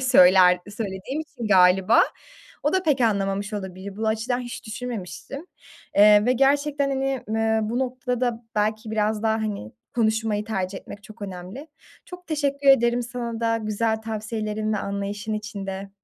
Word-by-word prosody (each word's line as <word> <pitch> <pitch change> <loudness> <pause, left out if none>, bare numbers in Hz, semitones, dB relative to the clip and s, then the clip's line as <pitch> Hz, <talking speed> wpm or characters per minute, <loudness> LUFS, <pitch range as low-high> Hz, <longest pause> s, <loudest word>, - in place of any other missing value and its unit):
söyler 185 -7 +6 0.2
söylediğim 215 +7 -4
için 245 -7 -7
galiba, 185 +2 +5 0.6
o 295 - +1
da 375 - +2
pek 295 -6 +1
anlamamış 200 -2 0
olabilir. 190 -1 -6
Bu 220 - -2
açıdan 230 +3 -1
hiç 240 -1 -8
düşünmemiştim. 245 - -6 0.5
Eee, 210 0 +7
ve 250 - +4
gerçekten 280 +2 +2
hani, 270 -1 -1
eee, 220 0 +1
bu 225 +3 -2
noktada 250 -2 -2
belki 215 +1 -1
biraz 215 0 0
daha, 220 - +2
hani, 210 - -4 0.2
konuşmayı 220 -2 +1
tercih 190 -3 -3
etmek 205 - -11
çok 215 +2 -13
önemli. 190 - -7 0.4
Çok 360 0 -11
teşekkür 285 -2 0
ederim 240 -2 +5
sana 235 -1 -5
da 230 0 +1
güzel 220 0 0
tavsiyelerin 215 -1 -3
ve - - +1
anlayışın 200 +2 -4
için 215 -2 -5
de. 195 +1 -5
220 Hz, 150 wpm, -24 LUFS, 205-245 Hz, 0.6 s, Eee